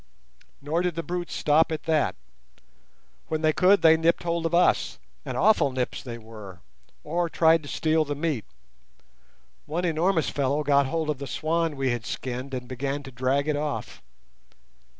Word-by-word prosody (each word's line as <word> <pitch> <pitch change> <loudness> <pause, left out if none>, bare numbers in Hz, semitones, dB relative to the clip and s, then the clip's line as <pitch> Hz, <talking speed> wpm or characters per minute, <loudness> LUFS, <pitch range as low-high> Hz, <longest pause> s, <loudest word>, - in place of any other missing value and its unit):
Nor 160 +4 0
did 180 -2 -1
the 165 - -3
brutes 175 0 -4
stop 155 +2 +3
at 160 - -3
that. 155 - +1 1.1
When 155 0 -2
they 155 0 +4
could 185 +1 +4
they 160 0 +7
nipped 165 +2 +1
hold 170 -1 0
of 170 - -1
us—and 175 - 0
awful 215 -9 +4
nips 130 -1 -3
they 120 -2 -7
were—or 110 - -7
tried 165 0 +4
to 145 - -10
steal 160 0 +1
the 145 -1 -4
meat. 145 -7 -2 1.2
One 170 +4 -2
enormous 165 0 +1
fellow 140 +2 0
got 140 -2 +3
hold 160 +1 -1
of 145 - -5
the 140 - -5
swan 160 +3 -1
we 135 -2 0
had 120 -2 -4
skinned 130 +1 -4
and 125 -1 -6
began 135 +3 -3
to 135 - -10
drag 130 +3 0
it 150 - +1
off. 145 0 -4
150 Hz, 165 wpm, -26 LUFS, 135-165 Hz, 1.2 s, they